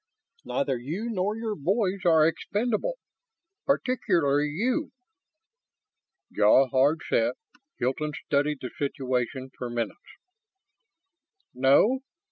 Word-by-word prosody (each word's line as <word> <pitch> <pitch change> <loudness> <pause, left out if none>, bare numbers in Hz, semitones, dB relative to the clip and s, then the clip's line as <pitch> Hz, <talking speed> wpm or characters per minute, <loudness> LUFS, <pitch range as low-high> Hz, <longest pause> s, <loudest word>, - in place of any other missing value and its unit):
Neither 135 -2 -1
you 175 - -4
nor 205 +1 -1
your 225 -1 -3
boys 190 +3 -1
are 160 -3 +5
expendable. 215 - -1 0.7
Particularly 175 - +1
you." 250 - -1 1.4
Jaw 110 +6 +5
hard 140 +5 +3
set, - - +1 0.4
Hilton 150 +5 -1
studied 145 0 0
the 125 - -5
situation 130 -1 -2
for 125 - -5
minutes. 120 - -3 1.5
"No. 135 - +4
150 Hz, 95 wpm, -27 LUFS, 135-210 Hz, 1.5 s, are